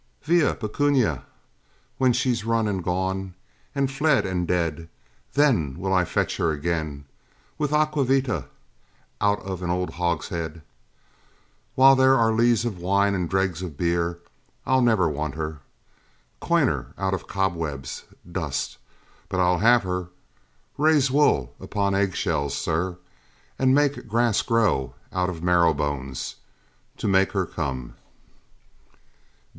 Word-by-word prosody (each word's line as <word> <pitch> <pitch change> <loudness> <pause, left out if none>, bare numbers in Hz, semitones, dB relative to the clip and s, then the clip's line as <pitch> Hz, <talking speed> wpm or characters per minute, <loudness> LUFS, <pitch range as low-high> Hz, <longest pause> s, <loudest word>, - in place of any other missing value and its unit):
Via, 165 -1 +3
Pecunia! 120 - 0 0.7
when 130 -1 +4
she's 120 -2 0
run 115 -1 +1
and 95 -3 -2
gone 95 +1 -2 0.4
And 135 -1 0
fled, 145 -2 +2
and 90 -2 -2
dead, 85 -2 -1 0.4
then 115 - +2
will 95 +1 -2
I 90 -1 +3
fetch - - -1
her - - +1
again 80 -2 -3 0.5
With 150 -1 0
aqua 150 -2 +2
vita, 130 -2 0 0.7
out 105 0 +2
of 95 -2 -5
an 90 - -3
old 90 +1 -1
hogshead! 85 -1 -3 1.1
While 135 +1 +7
there 130 0 +5
are 115 -1 +3
lees 115 0 +3
of 105 -7 -3
wine, 100 +3 +2
or 90 -3 -1
dregs 95 -1 0
of 85 -6 -6
beer, 85 0 0 0.5
I'll 130 0 +3
never 110 -8 +3
want 75 -1 -3
her! 80 -1 -4 0.8
Coin - - +2
her - - -2
out 95 0 -1
of 95 - -4
cobwebs, 80 -8 -3 0.3
Dust, 80 -6 -3 0.5
but 95 -1 -2
I'll 90 -1 +3
have 120 +2 +5
her! 90 -1 -3 0.7
raise 150 -3 +4
wool 130 - +2
upon 100 -1 -1
egg 95 -1 +1
shells, 70 -6 -1
Sir, 85 +2 -1 0.6
and 130 0 +4
make 145 -3 +1
grass 115 0 +2
grow 105 - +1 0.2
out 90 0 0
of 85 -2 -7
marrow 85 -3 +4
bones, 70 -3 -4 0.6
To - - -3
make 95 0 +3
her 95 -2 +1
come! 65 -8 -4
95 Hz, 135 wpm, -24 LUFS, 85-120 Hz, 1.1 s, While